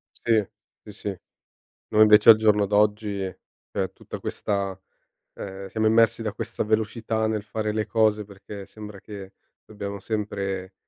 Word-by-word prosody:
Sì, 110 -4 +2 0.4
sì, 105 - -10
sì, 105 - -5 0.8
noi 110 - +4
invece 105 0 +8
al 115 - +12
giorno 105 -2 +3
d'oggi 105 0 +2 0.5
cioè - - -2
tutta - - -9
questa 100 -2 -2 0.6
ehm, 95 0 -7
siamo 110 +3 -1
immersi 115 +1 +4
da 105 -2 -2
questa - - -4
velocità 110 +1 0
nel 110 -1 -1
fare 110 0 -3
le 110 0 -1
cose 110 -1 +2
perché 100 0 -10
sembra 105 -1 -10
che 100 -2 -10 0.3
dobbiamo 100 -1 -6
sempre 100 -3 -3
105 Hz, 145 wpm, -25 LUFS, 100-110 Hz, 0.8 s, al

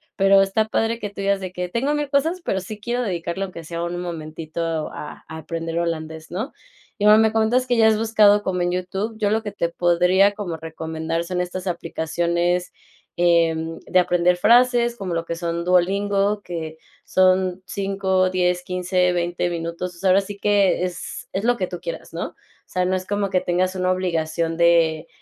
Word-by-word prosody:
pero 195 0 +5
está 205 +3 +1
padre 225 +1 0
que 205 - -4
tú 200 - -7
digas 200 0 +1
de 185 -1 -6
que: 180 0 -4
"Tengo 260 +9 0
1000 295 -1 -2
cosas, 325 +6 +1
pero 190 - -1
sí 210 +3 -8
quiero 240 +3 -2
dedicarle 175 -2 -3
aunque 185 -3 -7
sea 170 +1 -5
un 175 +1 -3
momentito 160 -2 -6 0.3
a 150 - -8
aprender 165 +1 -5
holandés, 160 -1 -4
¿no?". 215 - -4 0.5
Y, - - +2
bueno, 210 +1 +8
me 220 0 +4
comentas 225 +3 +2
que 245 -1 +1
ya 225 -1 +6
has 220 -1 +4
buscado 210 -2 +4
como 180 -2 -1
en 175 0 +1
YouTube, 190 +5 -3
yo 210 -2 +1
lo 220 +1 +1
que 210 -2 -5
te 170 -4 -1
podría 180 +3 +3
como 190 -6 -5
recomendar 160 +1 -4
son 180 +1 -3
estas 180 +1 -4
aplicaciones, 170 +1 -1 0.4
em, 165 -2 +2
de 185 - +3
aprender 180 0 +3
frases, 240 +4 +4
como 190 -5 -4
lo 165 0 -1
que 170 - -3
son 170 0 -3
Duolingo, 200 +3 +2
que 160 -2 -6 0.3
son, 185 0 +2 0.7
10 180 -1 +1
15 180 0 0
20 175 0 -1
minutos. 170 +1 -4
Pues 170 - -15
ahora 190 0 +5
sí 200 0 -6
que 200 -3 +2
es, 180 -2 -5
es 195 +3 -2
lo 245 +1 +3
que 185 -6 -2
tú 180 -1 -7
quieras, 165 -2 -7
¿no? 165 - -3
O - - -37 0.3
sea, 185 - -1
no 185 +1 +1
es 185 - -6
como 205 -1 -1
que 185 - +2
tengas 185 +1 0
una 185 0 +1
obligación 165 -2 -1
de 170 -1 +3
180 Hz, 190 wpm, -22 LUFS, 170-205 Hz, 0.7 s, bueno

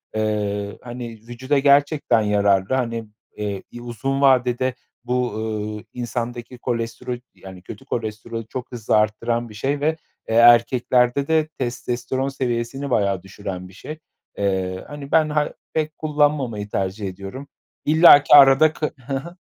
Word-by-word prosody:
Eee, 105 -1 -2
hani, 120 -1 -7 0.2
vücuda 130 +4 -1
gerçekten 140 -4 +3
yararlı, 100 0 +2
hani, 115 -3 -2 0.3
eee, 100 -2 -4
i 120 - -9
uzun 135 +4 -3
vadede 130 -1 +3 0.3
bu, 125 -2 -1
ııı, 105 -1 -4
insandaki 120 0 -5
kolestero 120 0 -3 0.2
yani, 95 -1 -12
kötü 135 +8 -11
kolesterolü 115 -1 -5
çok 125 +2 -7
hızlı 120 -3 -1
arttıran 115 +2 0
bir - - -12
şey 135 +7 -2
ve, 155 +2 0 0.3
eee, 110 - 0
erkeklerde 120 +2 +4
de 160 -1 +2
testosteron 125 -1 -3
seviyesini 130 +1 -3
bayağı 100 -6 +1
düşüren 95 -1 -7
bir 95 - -16
şey. 155 +10 -8 0.4
Eee, 95 -2 -1
hani, 145 -1 -9
ben 155 -1 +4
ha 150 0 0 0.2
pek 155 -1 -2
kullanmamayı 145 -9 0
tercih 100 +1 -2
ediyorum. 100 +9 -8 0.4
İllaki 155 -2 +7
arada 140 +2 +7
k 150 - -3 0.2
Hı 140 - -3
hı, 160 +6 -5
120 Hz, 140 wpm, -22 LUFS, 105-135 Hz, 0.4 s, İllaki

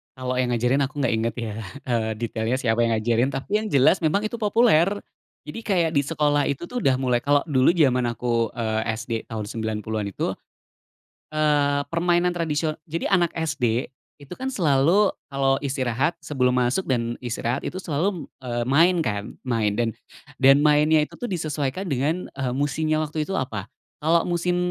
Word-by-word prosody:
Kalo 130 -1 -3
yang 125 -1 +1
ngajarin 125 +4 +2
aku 140 +2 -5
gak 130 - +2
inget 110 0 0
ya, 115 -3 -4 0.3
eee, 115 -3 -1
detailnya 115 +1 -2
siapa 115 -3 0
yang 115 - +1
ngajarin, 115 +3 +1
tapi 135 +11 -1
yang 215 - -4
jelas 140 +1 +4
memang 170 +5 +1
itu 220 +2 -3
populer. 210 -6 +4 0.6
Jadi 150 - -6
kayak 175 -6 +1
di 140 - +3
sekolah 145 -1 +1
itu 140 +3 -2
tuh 250 - -3
udah 130 - +4
mulai 125 -2 +1
kalo 145 0 +3
dulu 130 -2 +4
jaman 125 -7 +3
aku, 115 -1 0
eee, 110 -2 -1
SD 115 +2 -7 0.2
tahun 110 -2 -4
90-an 110 -1 -3
itu, - - -2 1.0
eee, 145 -2 +2
permainan 175 +1 +1
tradisio 155 -2 -1
jadi 165 +2 -2
anak 175 -3 +3
SD 125 -7 0 0.3
itu 145 -2 -17
kan 260 - -4
selalu, 180 - +3 0.2
kalau 135 -1 +1
istirahat 130 +1 -1
sebelum 125 -3 +1
masuk 125 +8 +1
dan 120 -2 -1
istirahat 120 +1 -3
itu 185 +1 -5
selalu, 170 +2 -2
eee, 120 -1 -2
main 165 +7 +4
kan, 105 -6 -3
main. 115 -5 0
Dan 115 +1 0 0.5
dan 135 +2 +6
mainnya 150 +1 +4
itu 150 - -5
disesuaikan 155 - -3
dengan, 145 +7 0
eee, 130 -2 -1
musimnya 155 +3 0
waktu 155 0 -2
itu 195 - -4
apa. 110 -6 -4 0.4
Kalau 165 +2 +3
musim 180 +1 0
140 Hz, 170 wpm, -24 LUFS, 120-160 Hz, 1.0 s, dan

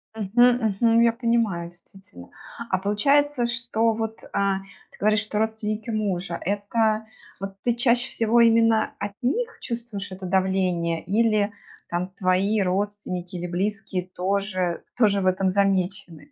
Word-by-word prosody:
Мгм. 225 0 +3
Мгм. 230 0 +5
Я 235 -1 +4
понимаю, 230 -8 0
действительно. 175 - -15 0.4
А 190 - +2
получается, 260 +7 +2
что 230 -1 +1
вот, 220 0 -4 0.2
а, 195 -1 +1
ты 195 -1 -18
говоришь, 215 0 +3
что 210 0 -3
родственники 220 0 -2
мужа- 190 -6 -2
это, 215 +3 0 0.3
вот, 195 0 -6
ты 240 -1 +1
чаще 240 +1 +2
всего 230 +1 +2
именно 225 -1 +4
от 205 0 -4
них 460 - -1
чувствуешь 230 -5 -5
это 185 0 -7
давление 185 -3 0
или 215 +1 +1 0.4
там 175 +2 -2
твои 195 +3 +2
родственники 185 -1 -2
или 175 0 -4
близкие 190 0 -2
тоже 185 -1 -2
тоже 205 -4 +3
в - - -2
этом 185 0 +2
замечены? 190 -5 -1
205 Hz, 135 wpm, -24 LUFS, 185-225 Hz, 0.4 s, Мгм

